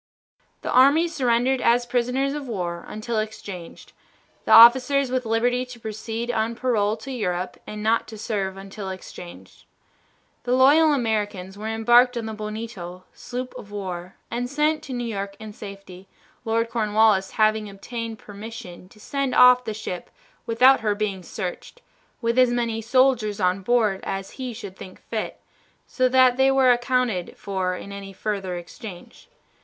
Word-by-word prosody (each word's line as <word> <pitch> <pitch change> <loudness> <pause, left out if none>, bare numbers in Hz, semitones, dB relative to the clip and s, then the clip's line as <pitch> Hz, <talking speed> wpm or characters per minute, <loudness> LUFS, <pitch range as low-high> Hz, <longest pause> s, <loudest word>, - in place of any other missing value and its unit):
The - - -3
army 280 +6 +5
surrendered 255 -3 +1
as 240 +1 +3
prisoners 250 +3 0
of 290 -2 -5
war 175 -6 -4
until 215 +1 -3
exchanged, 200 -5 -7 0.5
the - - -1
officers 260 +3 +7
with 255 -2 -1
liberty 245 +3 +1
to 250 -1 -11
proceed 225 +2 -4
on 225 0 -1
parole 220 -4 0
to 255 +5 -8
Europe 185 -7 -3
and 210 0 -6
not 225 +1 +2
to 220 - -9
serve 195 -3 -3
until 195 0 -7
exchanged. 180 -2 -10 0.8
The 245 - 0
loyal 290 +5 +6
Americans 210 -7 -1
were 210 +2 -6
embarked 240 +3 +4
on 230 - -3
the 220 - -5
Bonito, 210 -4 -7
sloop 250 +1 -6
of 205 - -12
war, 185 -3 -6 0.2
and 245 +1 -2
sent 300 +2 +1
to 265 - -6
New 245 -1 -3
York 200 -3 -4
in 215 -1 -9
safety, 195 -2 -11 0.4
Lord 230 +1 0
Cornwallis 215 -3 +2
having 215 -1 +2
obtained 225 +3 -6
permission 205 -3 -10
to 210 - -19
send 275 +3 -2
off 250 0 +7
the 220 - -3
ship 180 -4 -6 0.4
without 255 +4 +5
her 210 -2 0
being 205 -3 -2
searched, 180 - -6 0.4
with 235 +2 +2
as 255 -1 +6
many 235 -2 -1
soldiers 235 -3 +2
on 185 0 +1
board 215 -3 +2
as 195 0 -5
he 255 -1 -3
should 210 -5 -9
think 185 -1 -11
fit, 220 -2 -5 0.5
so 255 -1 +1
that 255 -1 +5
they 265 0 +4
were 265 -2 +5
accounted 245 -6 0
for 190 -2 -2
in 200 - -9
any 200 -1 -8
further 195 -2 -3
exchange. 175 - -10
225 Hz, 160 wpm, -24 LUFS, 200-250 Hz, 0.8 s, officers